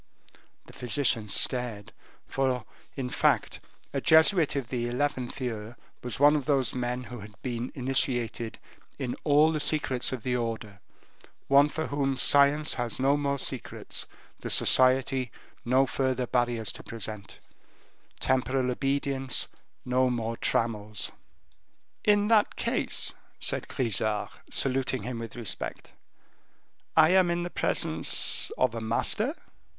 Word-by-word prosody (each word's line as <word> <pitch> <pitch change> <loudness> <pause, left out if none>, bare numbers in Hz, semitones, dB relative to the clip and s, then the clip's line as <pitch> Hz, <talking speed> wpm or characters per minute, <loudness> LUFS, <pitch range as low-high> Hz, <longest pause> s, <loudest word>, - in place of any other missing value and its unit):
The - - -15
physician 120 -4 +1
started, 120 -3 0 0.3
for, 130 -3 -1 0.3
in 125 -3 -4
fact, - - +1 0.3
a - - -1
Jesuit 160 0 +5
of 135 -4 -3
the 120 -2 -2
eleventh 130 +1 -2
year 115 -2 -5 0.3
was 125 -1 -5
one 145 +1 +6
of 145 -3 -1
those 135 -3 +1
men 125 0 -3
who 120 0 -9
had 105 0 -13
been 120 -1 -4
initiated 125 -3 0 0.4
in 130 -3 -3
all 150 +2 +4
the 155 - -2
secrets 145 -4 -1
of 130 -4 -5
the 125 -1 -1
order, 115 -4 -4 0.7
one 140 +1 +6
of 150 - -12
those 160 0 -1
for - - -5
whom 135 -2 0
science 145 +3 +4
has 120 -1 -4
no 135 +2 +3
more 140 -1 -1
secrets, 130 -1 -5 0.3
the - - -6
society 130 0 +4 0.3
no 130 +3 +3
further 130 -1 -1
barriers 120 -3 0
to - - -10
present 110 -2 -8 0.8
temporal 130 0 +1
obedience, 135 0 -1 0.4
no 130 0 +2
more 115 -2 -2
trammels. 110 -4 -2 0.9
"In 205 0 +3
that 215 -2 +3
case," - - +1 0.3
said - - 0
Grisart, 110 -3 0 0.2
saluting 130 -1 0
him 120 -1 -5
with 115 -2 -7
respect, 115 -6 -4 1.1
"I 155 0 +7
am 185 -1 +4
in 170 0 -1
the 175 - -5
presence 80 +1 +2
of 130 -3 +2
a 115 - -5
master?" 210 - 0
130 Hz, 135 wpm, -28 LUFS, 120-140 Hz, 1.1 s, I